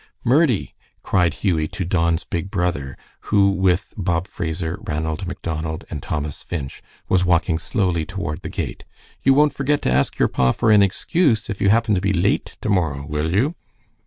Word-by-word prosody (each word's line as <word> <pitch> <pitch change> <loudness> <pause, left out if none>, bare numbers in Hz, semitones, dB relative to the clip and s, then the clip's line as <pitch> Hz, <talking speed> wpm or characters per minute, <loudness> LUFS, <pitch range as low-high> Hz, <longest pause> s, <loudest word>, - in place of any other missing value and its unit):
"Murdie," 130 - +2 0.3
cried 90 -3 +2
Hughie 80 -3 0
to 90 - -4
Don's 85 -2 +1
big 85 +3 -4
brother, 90 - -2 0.3
who 100 -2 +4
with 95 0 +1
Bob 90 -3 -1
Fraser, 85 +1 -3
Ranald 80 +3 -2
Macdonald, 80 -3 -4
and 75 - -4
Thomas 75 -1 -4
Finch 70 -6 -5 0.3
was 95 -1 +3
walking 85 -2 +2
slowly 90 -7 0
toward 90 -2 -5
the - - -6
gate, - - -5 0.4
"you 135 0 +4
won't 150 +1 +4
forget 145 +2 +1
to - - +1
ask 65 +2 +1
your - - +3
pa 65 -1 +2
for 115 -2 +2
an 105 -1 +7
excuse 115 - +1
if 100 - -6
you 100 - +4
happen 110 +1 +3
to 90 - +1
be 100 0 +1
late 95 +2 0
to - - -2
morrow, 80 -8 0
will 75 +2 -2
you?" 125 - +2
90 Hz, 180 wpm, -21 LUFS, 80-100 Hz, 0.4 s, an